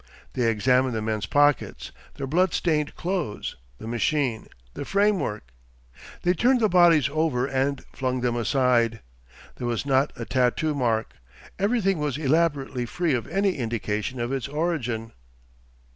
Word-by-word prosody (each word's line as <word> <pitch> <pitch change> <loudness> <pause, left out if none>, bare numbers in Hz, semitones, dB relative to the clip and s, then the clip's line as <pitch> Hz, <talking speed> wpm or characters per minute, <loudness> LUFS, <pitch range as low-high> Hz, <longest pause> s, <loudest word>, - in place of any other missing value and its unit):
They 120 -3 +1
examined 125 +3 +2
the 110 - -1
men's 110 -3 -2
pockets, 145 +4 +1 0.2
their 140 - -4
bloodstained 160 -1 +1
clothes, 175 - -3 0.2
the - - -10
machine, 120 +1 -1 0.3
the - - -5
framework. 190 - 0 0.7
They 180 - +3
turned 250 +8 +3
the 220 - +3
bodies 170 -5 +5
over 155 -6 +1
and 135 0 -1
flung 130 -1 -2
them 120 -1 0
aside. 120 -2 +2 0.6
There 120 - -3
was 120 +2 -2
not 135 +1 +2
a 115 - -6
tattoo 130 +5 +1
mark.... 115 -5 0 0.5
Everything 195 -3 +1
was 145 -3 -1
elaborately 140 -4 0
free 170 +4 0
of 120 -4 -2
any 195 -2 0
indication 115 0 -3
of 120 +2 -2
its 135 -1 -2
origin. 140 -8 -2
135 Hz, 140 wpm, -25 LUFS, 120-160 Hz, 0.7 s, bodies